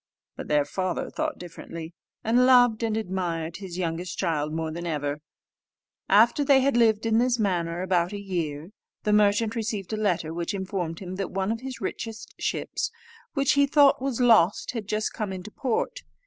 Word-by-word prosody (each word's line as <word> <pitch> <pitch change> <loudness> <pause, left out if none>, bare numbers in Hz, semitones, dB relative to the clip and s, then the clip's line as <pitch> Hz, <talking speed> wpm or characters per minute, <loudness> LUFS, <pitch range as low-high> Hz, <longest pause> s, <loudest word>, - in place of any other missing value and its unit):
But - - -7
their 150 -1 +2
father 185 +1 -3
thought 310 -1 -2
differently: 165 -1 -8 0.3
and 245 +3 +4
loved 245 -3 +5
and 220 -1 0
admired 175 -5 -3
his 185 -3 -7
youngest 170 0 -3
child 155 -4 -1
more 160 0 -2
than 170 +2 -5
ever. 145 -2 -2 0.9
After 225 +8 +5
they 275 -1 +5
had 275 -1 +2
lived 225 -2 +3
in 225 0 +3
this 245 0 +2
manner 175 -5 -1
about 180 -1 +1
a 205 - -5
year, 170 -4 -4 0.3
the 210 - +2
merchant 210 +2 +3
received 215 -3 -3
a - - -1
letter, 180 -6 0
which 170 +3 -3
informed 185 -4 -3
him 185 0 -6
that 195 - -2
one 190 +2 -1
of 225 +1 -3
his 260 -1 -7
richest 225 -1 -5
ships, - - -2 0.5
which 275 -1 +3
he 280 0 +4
thought 285 -2 +5
was 265 -3 -2
lost, 220 -7 +4
had 225 -5 -5
just 215 +1 -1
come 210 -3 -3
into 185 +2 -7
port. 275 - -2
200 Hz, 180 wpm, -26 LUFS, 170-230 Hz, 0.9 s, loved